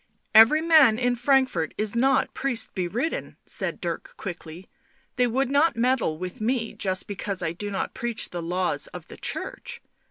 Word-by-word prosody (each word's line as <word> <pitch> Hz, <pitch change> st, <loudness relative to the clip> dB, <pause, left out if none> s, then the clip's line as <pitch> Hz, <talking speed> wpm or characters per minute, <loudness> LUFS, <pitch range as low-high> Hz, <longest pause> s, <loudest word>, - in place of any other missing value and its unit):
" -, -, -49 dB
Every 225 Hz, +8 st, +7 dB
man 310 Hz, -9 st, +6 dB
in 245 Hz, 0 st, +1 dB
Frankfort 250 Hz, -, +1 dB
is 215 Hz, +1 st, -1 dB
not 265 Hz, +3 st, +2 dB
priest 255 Hz, -5 st, -1 dB
beridden," 210 Hz, -, -3 dB
said -, -, -3 dB
Dirk -, -, -5 dB
quickly. 175 Hz, -1 st, -8 dB, 0.3 s
" -, -, -39 dB
They 250 Hz, 0 st, +3 dB
would 255 Hz, +2 st, 0 dB
not 290 Hz, +1 st, +3 dB
meddle 240 Hz, -9 st, +1 dB
with 180 Hz, +4 st, -7 dB
me 230 Hz, 0 st, -1 dB
just 185 Hz, -1 st, -1 dB
because 200 Hz, -1 st, -2 dB
I 160 Hz, -, 0 dB
do 205 Hz, +5 st, -5 dB
not 195 Hz, -, -3 dB
preach 235 Hz, -2 st, -2 dB
the 175 Hz, -, -4 dB
laws 180 Hz, -, -1 dB
of -, -, -10 dB
the -, -, -10 dB
Church. 485 Hz, -1 st, -4 dB
230 Hz, 180 wpm, -25 LUFS, 185-265 Hz, 0.3 s, Every